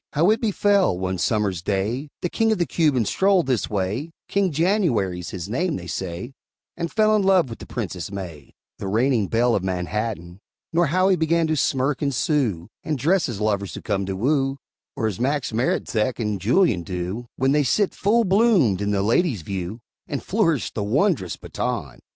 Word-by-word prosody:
How 165 +7 +4
it 220 - +1
befell, 205 - +2
one 95 0 -2
summer's 100 -6 0
day, 105 - -2
The 175 - 0
king 225 +3 +1
of 220 - +2
the 175 - +1
Cubans 145 - +1
strolled 190 -2 +3
this 130 -5 0
way 105 - -2 0.2
King 195 -2 +1
January's 140 - +1
his 90 -2 -6
name, 165 - -1
they 90 - -6
say 90 +7 -5 0.4
And 170 -1 -3
fell 215 0 +3
in 210 - +3
love 190 -9 +3
with 115 - -8
the - - -10
Princess 95 -6 -5
May, 85 -8 -8 0.2
The - - -4
reigning 115 +1 +2
belle 120 +3 +2
of 95 - 0
Manhattan; 95 0 -3 0.3
Nor 170 0 +3
how 185 +5 +2
he 190 - +5
began 165 0 +2
to 160 0 0
smirk 135 0 0
and 140 -2 +1
sue, 120 - 0 0.2
And 155 -2 -2
dress 165 +5 +2
as 110 -5 -5
lovers 100 -4 -1
who - - -7
come 100 -3 -1
to 95 - -2
woo, 135 +5 +1 0.4
Or - - -2
as 105 -5 -2
Max 135 -1 -1
Maretzek 115 0 0
and 105 -4 -2
Julien 115 - +3
do, 90 +6 -4
When 135 +1 +1
they 150 +1 +3
sit 190 - +1
full 225 +4 +2
bloomed 190 - +3
in 100 - -1
the 100 -1 +1
ladies' 115 - +1
view, 95 +5 -5 0.3
And 140 - -4
flourish 170 - +1
the 105 - -2
wondrous 130 - +1
baton. - - -4
125 Hz, 190 wpm, -23 LUFS, -, 0.4 s, he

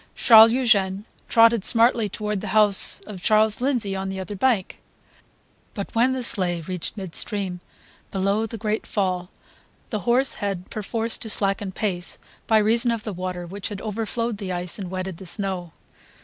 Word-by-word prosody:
Charles 225 -1 +7
Eugene 210 -6 +1 0.2
trotted 230 -2 +5
smartly 230 -1 +3
toward 210 0 -3
the - - -6
house 205 -2 +4
of 200 -4 -10
Charles 215 +2 +3
Lindsay 240 -7 0
on 190 0 -4
the 190 0 -5
other 195 +2 -6
bank. 215 -2 0 0.9
But 200 -3 -6
when 240 +3 +3
the 260 -1 -3
sleigh 180 -6 0
reached 180 +4 -6
midstream, 190 0 0 0.5
below 200 +3 0
the 225 - -7
great 215 0 -3
fall, 185 -3 -2 0.6
the 215 - -2
horse 245 +5 +2
had 195 -3 -4
perforce 225 +2 -2
to 225 - -7
slacken 195 -1 0
pace 180 -3 -2 0.3
by 220 - +4
reason 230 +3 +3
of 230 -2 -2
the 215 - -5
water 180 -1 -5
which 195 +5 -6
had 205 -2 -6
overflowed 225 +1 -3
the 195 -3 -4
ice 180 +2 -3
and 190 -3 -5
wetted 185 -1 -5
the 190 - -10
snow. 185 -3 -2
205 Hz, 165 wpm, -23 LUFS, 190-225 Hz, 0.9 s, Charles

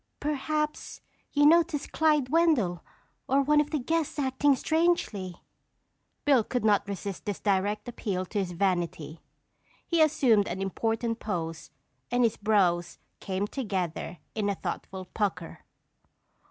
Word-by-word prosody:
Perhaps 300 +1 -2 0.3
you 290 0 +3
noticed 330 -1 +3
Clyde 300 -5 +2
Wendell 275 - +2 0.4
or 275 +2 +3
one 295 +1 +4
of 295 - -4
the 305 - -1
guests 320 +4 -1
acting 275 0 +2
strangely." 290 - 0 0.8
Bill 275 -6 +5
could 245 0 -2
not 210 -1 +3
resist 200 -1 -5
this 205 -2 -3
direct 205 +2 0
appeal 195 -6 -3
to 205 +3 -3
his 180 -3 -2
vanity. 170 -4 -1 0.6
He 335 -2 +2
assumed 245 -9 +4
an - - -4
important 225 +4 -1
pose 165 -5 -4 0.4
and 245 +1 +2
his 230 - +2
brows 185 -5 +1 0.2
came 190 +1 -2
together 190 - -3 0.2
in 210 -2 -1
a 200 - 0
thoughtful 190 -1 -5
pucker. 185 -3 -3
220 Hz, 130 wpm, -28 LUFS, 190-290 Hz, 0.8 s, Bill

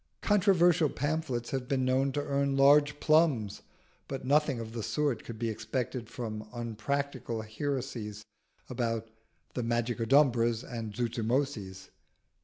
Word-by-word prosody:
Controversial 180 -6 +4
pamphlets 145 -6 -2
have 130 -3 -2
been 130 -1 +1
known 130 +2 +2
to 145 - -1
earn 140 -1 0
large 145 +2 +5
plums; 150 -10 +2 0.5
but 135 -1 -5
nothing 145 -2 +2
of 110 -1 -6
the 115 0 -4
sort 145 0 -1
could 115 - -8
be 115 +1 -2
expected 115 +2 -3
from 110 -3 -6
unpractical 120 +1 -3
heresies 110 -3 -4 0.4
about 115 -2 -2 0.4
the 125 - -2
Magicodumbras 120 0 +2
and 115 -4 -6
Zuzumotzis. 115 -5 -2
125 Hz, 120 wpm, -30 LUFS, 115-140 Hz, 0.5 s, large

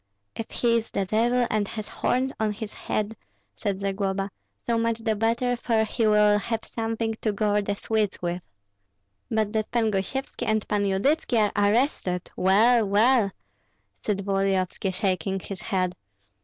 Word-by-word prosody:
"If 225 - -5
he 235 -1 +2
is 230 0 -3
the 195 - -1
devil 235 +5 +2
and 210 -2 +1
has 215 -1 -6
horns 260 +3 0
on 215 -1 +1
his 215 0 -7
head," 215 +1 -2 0.4
said 200 -2 -3
Zagloba, 195 0 -1 0.3
"so 230 -1 +1
much 230 0 +1
the 220 -1 +1
better, 235 +3 +1
for 230 -2 +1
he 220 +1 0
will 210 -1 +5
have 225 +1 -3
something 225 0 -2
to 215 - +1
gore 210 0 +1
the 205 0 -2
Swedes 215 -1 -1
with." 175 0 -2 0.9
"But 220 -1 0
that 215 -1 -1
Pan 225 -2 +1
Gosyevski 210 +8 -3
and 220 -1 +1
Pan 205 -1 +1
Yudytski 245 +7 +1 0.2
are 205 -1 +3
arrested, 210 - 0
well, 225 +5 +4
well!" 215 +2 +4 0.7
said 200 -2 -1
Volodyovski, 195 -1 0
shaking 190 0 -1
his 190 0 -7
head. 185 -3 -1
215 Hz, 155 wpm, -26 LUFS, 195-230 Hz, 0.9 s, will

